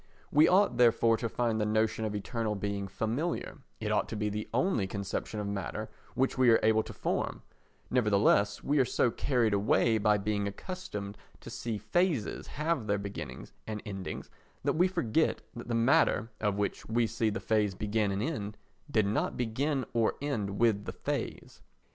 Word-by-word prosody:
We 150 Hz, +2 st, +6 dB
ought 185 Hz, -8 st, +4 dB
therefore 115 Hz, -1 st, +5 dB
to 115 Hz, -, -2 dB
find 115 Hz, -1 st, 0 dB
the -, -, +2 dB
notion 110 Hz, 0 st, +1 dB
of 105 Hz, -1 st, -2 dB
eternal 110 Hz, +1 st, -2 dB
being 100 Hz, 0 st, -3 dB
familiar, 115 Hz, -, -2 dB, 0.2 s
it 105 Hz, -1 st, -2 dB
ought 105 Hz, -, +1 dB
to -, -, -4 dB
be 105 Hz, 0 st, -1 dB
the 105 Hz, +1 st, -4 dB
only 150 Hz, -, +1 dB
conception 100 Hz, +2 st, -4 dB
of 105 Hz, -, -2 dB
matter 100 Hz, -2 st, -4 dB, 0.2 s
which 130 Hz, 0 st, +1 dB
we 130 Hz, -2 st, +6 dB
are 115 Hz, -, +6 dB
able 110 Hz, 0 st, +4 dB
to -, -, -8 dB
form: -, -, -2 dB, 0.5 s
nevertheless, 105 Hz, -3 st, +3 dB
we 145 Hz, +1 st, +2 dB
are -, -, +6 dB
so 125 Hz, -1 st, +1 dB
carried 120 Hz, -3 st, +1 dB
away 110 Hz, +2 st, +3 dB
by 105 Hz, 0 st, +4 dB
being 100 Hz, 0 st, -1 dB
accustomed 105 Hz, -, -6 dB, 0.2 s
to -, -, -9 dB
see 115 Hz, -2 st, -3 dB
phases 170 Hz, -, 0 dB
have 150 Hz, -6 st, -1 dB
their 100 Hz, -1 st, +2 dB
beginnings 100 Hz, 0 st, -7 dB
and 105 Hz, -1 st, -3 dB
endings 95 Hz, -3 st, -6 dB, 0.3 s
that -, -, +2 dB
we 180 Hz, +4 st, +4 dB
forget 160 Hz, -5 st, 0 dB
that 120 Hz, -, -7 dB
the 120 Hz, -, -1 dB
matter, 115 Hz, -1 st, +3 dB
of 105 Hz, -2 st, 0 dB
which 105 Hz, -1 st, -2 dB
we 115 Hz, +1 st, +2 dB
see 115 Hz, 0 st, 0 dB
the 105 Hz, -, -3 dB
phase 105 Hz, -3 st, +1 dB
begin 105 Hz, 0 st, 0 dB
and 100 Hz, +2 st, -1 dB
end, 105 Hz, -8 st, -3 dB, 0.3 s
did 110 Hz, -6 st, +2 dB
not 100 Hz, +2 st, 0 dB
begin 130 Hz, +3 st, 0 dB
or 115 Hz, -2 st, +2 dB
end 105 Hz, -9 st, -2 dB
with 110 Hz, -3 st, +2 dB
the -, -, -5 dB
phase. -, -, -4 dB
110 Hz, 180 wpm, -30 LUFS, 105-125 Hz, 0.5 s, We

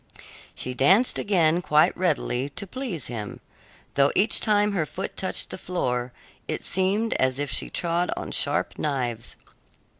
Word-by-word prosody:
She 125 Hz, -, -3 dB
danced 190 Hz, -, +4 dB
again 175 Hz, -4 st, +2 dB
quite 150 Hz, -3 st, +3 dB
readily, 120 Hz, -, 0 dB
to 145 Hz, +8 st, -5 dB
please 205 Hz, -, -5 dB
him, 110 Hz, -4 st, -6 dB, 0.5 s
though 140 Hz, 0 st, +3 dB
each 215 Hz, +4 st, +4 dB
time 210 Hz, -1 st, +3 dB
her 175 Hz, -6 st, -1 dB
foot 195 Hz, -, -6 dB
touched 185 Hz, -, -2 dB
the -, -, -7 dB
floor 125 Hz, -10 st, -2 dB, 0.4 s
it -, -, -3 dB
seemed 195 Hz, +5 st, +1 dB
as 130 Hz, 0 st, +1 dB
if 145 Hz, -1 st, -3 dB
she -, -, -2 dB
trod 175 Hz, +1 st, -1 dB
on -, -, -5 dB
sharp -, -, 0 dB
knives. 125 Hz, -6 st, -3 dB
165 Hz, 150 wpm, -25 LUFS, 130-195 Hz, 0.5 s, danced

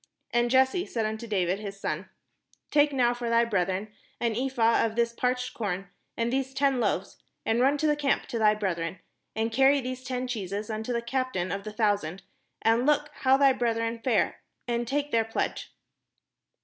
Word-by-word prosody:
And 240 Hz, 0 st, +2 dB
Jesse 265 Hz, +8 st, +3 dB
said 225 Hz, -2 st, -1 dB
unto 220 Hz, +2 st, -4 dB
David 190 Hz, -2 st, 0 dB
his 200 Hz, -2 st, -7 dB
son: -, -, -3 dB, 0.6 s
"Take 295 Hz, 0 st, +4 dB
now 245 Hz, -3 st, +2 dB
for 240 Hz, -1 st, -4 dB
thy 230 Hz, 0 st, +4 dB
brethren 195 Hz, 0 st, -1 dB, 0.3 s
an 230 Hz, -2 st, 0 dB
ephah 240 Hz, -2 st, +2 dB
of 220 Hz, -1 st, -1 dB
this 235 Hz, 0 st, +1 dB
parched 250 Hz, +1 st, -1 dB
corn, 195 Hz, -4 st, -3 dB, 0.3 s
and 235 Hz, +1 st, 0 dB
these 265 Hz, 0 st, -1 dB
ten 275 Hz, -2 st, +2 dB
loaves, 200 Hz, -4 st, -1 dB, 0.3 s
and 225 Hz, +1 st, +2 dB
run 275 Hz, +3 st, +4 dB
to 310 Hz, -, -1 dB
the 300 Hz, -1 st, +3 dB
camp 285 Hz, -2 st, 0 dB
to 235 Hz, -, -2 dB
thy 215 Hz, -1 st, +5 dB
brethren; 180 Hz, -4 st, -2 dB, 0.4 s
and 220 Hz, +1 st, 0 dB
carry 270 Hz, +4 st, +5 dB
these 255 Hz, 0 st, -5 dB
ten 255 Hz, 0 st, -3 dB
cheeses 210 Hz, -2 st, -4 dB
unto 220 Hz, +3 st, -3 dB
the 235 Hz, -1 st, -1 dB
captain 235 Hz, -8 st, -1 dB
of 200 Hz, +1 st, -4 dB
their 215 Hz, -, -6 dB
thousand, 200 Hz, -5 st, 0 dB, 0.4 s
and 230 Hz, +4 st, +3 dB
look 295 Hz, 0 st, +2 dB
how 265 Hz, 0 st, +3 dB
thy 275 Hz, -1 st, +5 dB
brethren 230 Hz, -1 st, -1 dB
fare, 230 Hz, -2 st, +1 dB, 0.3 s
and 240 Hz, 0 st, -1 dB
take 290 Hz, +3 st, -1 dB
their 230 Hz, -1 st, +3 dB
pledge." 225 Hz, 0 st, -3 dB
235 Hz, 185 wpm, -27 LUFS, 215-260 Hz, 0.6 s, thy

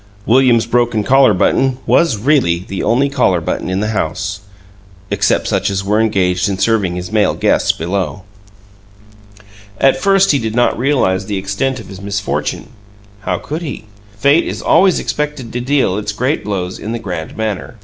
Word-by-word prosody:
William's 120 Hz, -1 st, +4 dB
broken 115 Hz, -2 st, +1 dB
collar 135 Hz, 0 st, +5 dB
button 125 Hz, +7 st, +1 dB
was 160 Hz, -10 st, +3 dB
really 120 Hz, -, +2 dB
the 95 Hz, -, -4 dB
only 125 Hz, +6 st, +2 dB
collar 125 Hz, -10 st, +1 dB
button 80 Hz, -, -3 dB
in 95 Hz, +2 st, -1 dB
the 105 Hz, -, -1 dB
house, 110 Hz, -, -2 dB, 0.7 s
except -, -, +1 dB
such -, -, 0 dB
as 100 Hz, -1 st, -2 dB
were 105 Hz, +3 st, +1 dB
engaged 95 Hz, -3 st, +1 dB
in 95 Hz, -, -2 dB
serving 100 Hz, -4 st, +1 dB
his 90 Hz, +1 st, -6 dB
male 105 Hz, -2 st, +2 dB
guests -, -, +2 dB
below. 90 Hz, +2 st, -3 dB, 1.6 s
At 135 Hz, -1 st, +4 dB
first 195 Hz, -1 st, +4 dB
he 140 Hz, -, +2 dB
did 110 Hz, -2 st, -3 dB
not 120 Hz, 0 st, +2 dB
realize 115 Hz, -8 st, 0 dB
the 105 Hz, -2 st, -2 dB
extent 100 Hz, +8 st, -2 dB
of 110 Hz, -, -10 dB
his 95 Hz, -1 st, -10 dB
misfortune. 100 Hz, +1 st, -3 dB, 0.5 s
How 90 Hz, -3 st, -2 dB
could 155 Hz, -, -5 dB
he? 145 Hz, -9 st, -6 dB, 0.3 s
Fate 140 Hz, +8 st, +3 dB
is -, -, -5 dB
always 185 Hz, +2 st, +4 dB
expected 150 Hz, -6 st, -4 dB
to 120 Hz, -, -2 dB
deal 125 Hz, -7 st, +1 dB
its 105 Hz, 0 st, -4 dB
great 130 Hz, +8 st, -1 dB
blows 95 Hz, -3 st, -4 dB
in 110 Hz, -, -5 dB
the -, -, -2 dB
grand 90 Hz, -7 st, -6 dB
manner. 110 Hz, 0 st, -4 dB
110 Hz, 170 wpm, -16 LUFS, 95-130 Hz, 1.6 s, collar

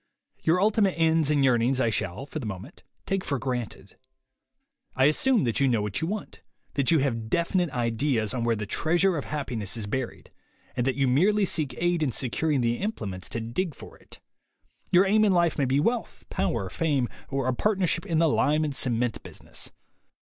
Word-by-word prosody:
Your 165 Hz, +3 st, +2 dB
ultimate 205 Hz, -1 st, +2 dB
ends 160 Hz, -2 st, +3 dB
and 145 Hz, -2 st, +3 dB
yearnings 125 Hz, +1 st, +2 dB
I 120 Hz, -3 st, +2 dB
shall, 95 Hz, +5 st, -3 dB
for 150 Hz, +2 st, -6 dB
the 120 Hz, -, -5 dB
moment, 95 Hz, -3 st, -8 dB, 0.2 s
take 195 Hz, -1 st, -1 dB
for 140 Hz, -, -1 dB
granted. 120 Hz, -5 st, -5 dB, 1.0 s
I 130 Hz, -, +4 dB
assume 225 Hz, -, +3 dB
that 115 Hz, -3 st, 0 dB
you 140 Hz, -, +3 dB
know 115 Hz, -5 st, +1 dB
what 105 Hz, +4 st, -3 dB
you 160 Hz, -, -1 dB
want, 210 Hz, +2 st, -5 dB, 0.3 s
that 140 Hz, -2 st, +1 dB
you 165 Hz, -, +5 dB
have 115 Hz, -5 st, -2 dB
definite 175 Hz, +3 st, +1 dB
ideas 115 Hz, -2 st, 0 dB
on 125 Hz, -2 st, -2 dB
where 115 Hz, -1 st, +2 dB
the 105 Hz, 0 st, -4 dB
treasure 175 Hz, -, +2 dB
of 150 Hz, -, -3 dB
happiness 125 Hz, -8 st, -3 dB
is 110 Hz, -, -3 dB
buried, 125 Hz, +3 st, -4 dB, 0.4 s
and 125 Hz, -, 0 dB
that 130 Hz, -, +1 dB
you 135 Hz, -1 st, +1 dB
merely 195 Hz, +11 st, +3 dB
seek 150 Hz, -8 st, 0 dB
aid 175 Hz, -1 st, +1 dB
in 145 Hz, -4 st, +1 dB
securing 140 Hz, +4 st, 0 dB
the 120 Hz, 0 st, +1 dB
implements 100 Hz, -, -4 dB
to 115 Hz, -, -3 dB
dig 135 Hz, +8 st, -3 dB
for -, -, -12 dB
it. -, -, -15 dB, 0.7 s
Your 180 Hz, +2 st, +6 dB
aim 215 Hz, +2 st, +4 dB
in 205 Hz, -3 st, +4 dB
life 170 Hz, -3 st, +2 dB
may 140 Hz, -, +3 dB
be 130 Hz, +2 st, +2 dB
wealth, 230 Hz, +9 st, -1 dB
power, -, -, -1 dB
fame, 145 Hz, -7 st, 0 dB, 0.2 s
or 135 Hz, -2 st, -1 dB
a 130 Hz, -, +2 dB
partnership 185 Hz, -, +1 dB
in 165 Hz, -4 st, 0 dB
the 165 Hz, +1 st, +4 dB
lime 150 Hz, +1 st, +2 dB
and 145 Hz, -3 st, -2 dB
cement 120 Hz, -3 st, 0 dB
business. -, -, -6 dB
140 Hz, 195 wpm, -26 LUFS, 120-170 Hz, 1.0 s, Your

